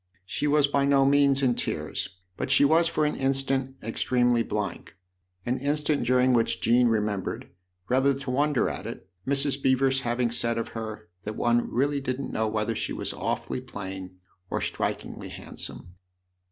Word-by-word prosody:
She 145 - -2
was 145 0 +4
by 140 -1 +1
no 140 -1 +4
means 140 0 +4
in 125 -2 +4
tears; 95 0 -3 0.3
but - - -3
she 135 +2 +6
was 165 +3 +4
for 155 -2 +1
an 150 - 0
instant 135 0 0
extremely 120 +1 +2
blank, 105 -4 -4 0.5
an 125 +2 0
instant 145 +2 0
during 125 0 +4
which 115 -2 +2
Jean 120 +2 +4
remembered, 105 -3 -1 0.4
rather 135 +3 +3
to 135 -1 -5
wonder 145 0 +2
at - - -4
it, 95 - -8 0.2
Mrs. 140 0 +1
Beever's 130 0 +3
having 120 -1 0
said 115 0 +1
of 115 - -2
her 110 -1 -6 0.2
that 105 +1 -5
one 120 +1 +1
really 140 +3 +1
didn't 135 0 -3
know 110 0 +1
whether 110 +1 -1
she - - -2
was - - -2
awfully - - -3
plain 95 -6 -7 0.3
or - - -1
strikingly - - -3
handsome. 90 - -7
130 Hz, 165 wpm, -27 LUFS, 115-140 Hz, 0.5 s, she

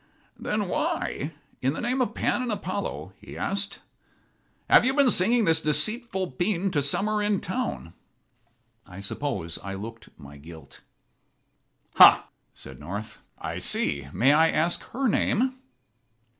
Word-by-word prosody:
"Then - - -2
why, - - -2 0.3
in 130 +2 +1
the - - -5
name 250 +2 0
of 250 - -1
Pan - - 0
and 250 -2 -2
Apollo," 185 - -4
he - - -11
asked, 200 0 -3 0.9
"have - - +6
you 260 +2 +1
been 280 -4 +4
singing 225 +5 +4
this 160 -2 +4
deceitful 190 - -1
pæan 185 +6 -1
to 145 - +1
summer 210 +10 0
in 205 -2 +1
town?" 185 - -4 0.9
I 95 -1 -11
suppose 100 - -4
I 95 0 -6
looked 115 +3 -9
my 70 -1 -13
guilt. 80 -1 -13 1.2
"Ha," - - +8 0.2
said 65 -1 -11
North, 105 +4 -7 0.2
"I - - -5
see. 70 -2 -1
May 135 - +3
I 160 +2 +5
ask 165 +3 +1
her 265 +2 -2
name?" 255 +4 +1
165 Hz, 140 wpm, -26 LUFS, -, 1.2 s, Ha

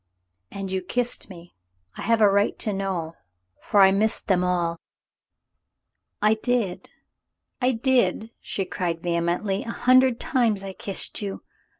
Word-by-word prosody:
"And 195 -1 -6
you 190 0 -1
kissed 245 +4 -2
me. 175 -2 -13 0.4
I - - -8
have 230 -1 +1
a 210 - +7
right 200 +1 +1
to 210 - -1
know, 190 -5 -3 0.5
for 205 - +2
I 190 0 +7
missed 215 +3 +1
them 180 -2 +2
all 170 -2 0 0.5
— - - -57
" - - -20
"I 210 +1 +5
did, 240 -8 -1 0.7
I 255 +1 +3
did," 230 -3 +1
she 195 - -3
cried 170 -2 -3
vehemently. 175 +3 -1
"A - - -8
hundred 255 +1 +3
times 230 -7 0
I 195 -1 -6
kissed 195 +2 -1
you. 200 -2 -5
195 Hz, 155 wpm, -24 LUFS, 180-230 Hz, 0.7 s, a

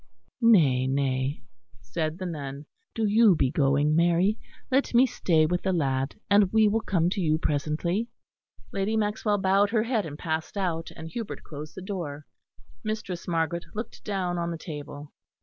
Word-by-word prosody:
"Nay, 150 - +5
nay," 135 +1 -1 0.4
said 155 +9 -3
the 185 - -5
nun. 145 -4 -5 0.3
"Do 225 - 0
you 210 -2 +5
be 135 -4 +1
going, 145 +1 +2
Mary. 175 +5 +3 0.4
Let 265 -1 +2
me 250 +2 +7
stay 170 -10 +2
with 175 +3 0
the 190 - 0
lad, 135 -5 0
and 200 -2 +4
we 220 -1 +5
will 220 +2 +1
come 175 -6 +1
to 200 - -1
you 155 -2 +2
presently." 160 +8 -1 0.7
Lady 200 +3 0
Maxwell 210 0 0
bowed 195 +1 +3
her 220 -1 +2
head 225 -6 0
and 145 -1 -8
passed 160 +3 -3
out, 170 -4 -1
and 160 0 -8
Hubert 230 +3 -6
closed 150 0 -9
the 190 - -7
door. 160 -7 -5 0.6
Mistress 215 -5 -4
Margaret 170 0 -1
looked 220 +3 -6
down 185 -4 -2
on 170 0 -1
the 170 - -4
table. 145 -2 -8
170 Hz, 165 wpm, -27 LUFS, 150-205 Hz, 0.7 s, me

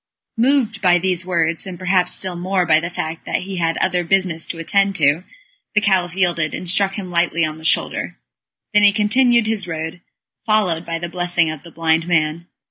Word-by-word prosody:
Moved 235 -4 +1
by 180 -3 +4
these 180 0 -1
words, 170 -1 0
and 185 -2 -7
perhaps 185 -1 +1
still 185 -2 -2
more 180 +1 0
by 155 -1 +4
the 170 +1 -4
fact 160 -2 -5
that - - -1
he 190 0 -6
had 165 -1 0
other 180 -1 0
business 175 -2 0
to 170 - -6
attend 195 +4 +1
to, 150 +2 +2 0.5
the - - +6
Caliph 185 -4 +1
yielded, 170 -5 0
and 180 - -7
struck 195 +2 +2
him 190 -4 -6
lightly 170 -1 +1
on 155 0 -5
the - - -14
shoulder. 160 - 0 0.6
Then 210 - +5
he 205 -1 +6
continued 235 +3 +3
his 215 -3 -2
road, 160 +1 -5 0.4
followed 185 -7 +1
by 165 0 -2
the 175 +1 -5
blessing 175 -2 0
of 155 -2 -8
the 170 - -13
blind 165 0 0
man. 160 0 0
175 Hz, 200 wpm, -19 LUFS, 165-195 Hz, 0.6 s, the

